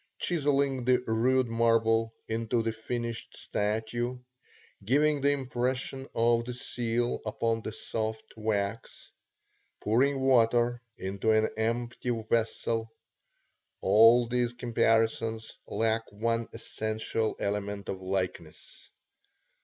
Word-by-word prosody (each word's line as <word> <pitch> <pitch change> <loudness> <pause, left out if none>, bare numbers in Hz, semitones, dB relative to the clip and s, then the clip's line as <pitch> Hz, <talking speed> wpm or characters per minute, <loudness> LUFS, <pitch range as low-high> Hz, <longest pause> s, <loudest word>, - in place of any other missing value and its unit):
Chiselling 140 -6 0
the 125 0 +5
rude 125 +3 +2
marble 115 -1 +2 0.2
into 115 +1 0
the 115 0 -1
finished 115 +1 -5
statue; 110 +4 -2 0.7
giving 145 +6 +2
the 140 - +3
impression 130 0 -2
of 115 0 +3
the 125 +1 -5
seal 120 -1 -1
upon 115 +1 -1
the 110 - -5
soft 110 0 -4
wax; 110 0 -3 0.7
pouring 135 +6 +2
water 120 -2 +3 0.2
into 95 +3 -2
an 110 0 +3
empty 120 +3 -2
vessel; 115 0 -1 0.9
all 115 +2 +6
these 120 0 0
comparisons 115 -2 0
lack 115 0 0
one 115 +2 -1
essential 110 0 -2
element 100 0 -3
of 95 -1 -4
likeness. 95 -1 -4
115 Hz, 100 wpm, -29 LUFS, 110-120 Hz, 0.9 s, all